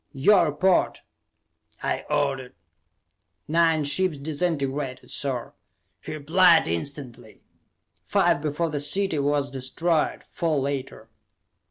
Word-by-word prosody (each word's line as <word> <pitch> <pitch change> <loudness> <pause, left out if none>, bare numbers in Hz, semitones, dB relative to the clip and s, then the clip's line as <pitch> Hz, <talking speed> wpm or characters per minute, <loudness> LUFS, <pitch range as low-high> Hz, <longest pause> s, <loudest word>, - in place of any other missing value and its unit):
"Your 170 +7 +4
report," 175 +5 +1 0.8
I - - -2
ordered. 135 -4 -1 0.9
"Nine 165 0 +3
ships 155 +3 +1
disintegrated, 145 -3 -3
sir," 130 -4 -3 0.5
he - - -6
replied 165 +3 +4
instantly. 120 - -6 0.6
"Five - - +2
before 155 +2 -1
the 145 - -2
city 160 +3 +1
was 140 0 0
destroyed, 150 +5 -1
four 165 -3 -2
later." 135 -1 -4
145 Hz, 95 wpm, -25 LUFS, 135-165 Hz, 0.9 s, Your